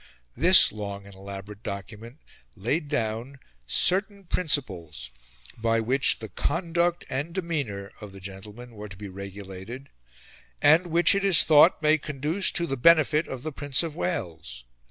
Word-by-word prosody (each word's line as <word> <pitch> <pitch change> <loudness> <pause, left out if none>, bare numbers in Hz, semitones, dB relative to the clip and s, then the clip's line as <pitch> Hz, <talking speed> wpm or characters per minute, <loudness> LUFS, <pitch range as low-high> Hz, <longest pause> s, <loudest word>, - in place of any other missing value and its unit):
This - - +7
long 100 -1 -7
and 100 - -13
elaborate 100 +2 -10
document 105 - -8 0.4
laid 145 - -2
down 120 -1 -3 0.3
"certain 195 - +1
principles" 105 - -2 0.4
by 115 0 0
which 130 +5 +2
the - - -9
"conduct 170 0 -1
and 145 +6 -4
demeanour" 140 - -4
of 105 -2 -9
the 95 - -12
gentlemen 105 +6 -10
were 105 -1 -9
to 95 - -11
be 100 0 -8
regulated 100 +6 -9 0.7
"and 160 +5 +4
which 170 +3 +3
it 200 0 -1
is 195 -5 +7
thought 155 +1 +5
may 155 +1 +4
conduce 150 +7 -1
to 170 - 0
the 135 -4 -3
benefit 155 +2 +4
of 130 -1 -7
the 155 - -4
Prince 145 0 -1
of 160 -3 -5
Wales." 80 - -5
130 Hz, 150 wpm, -25 LUFS, 100-160 Hz, 0.7 s, This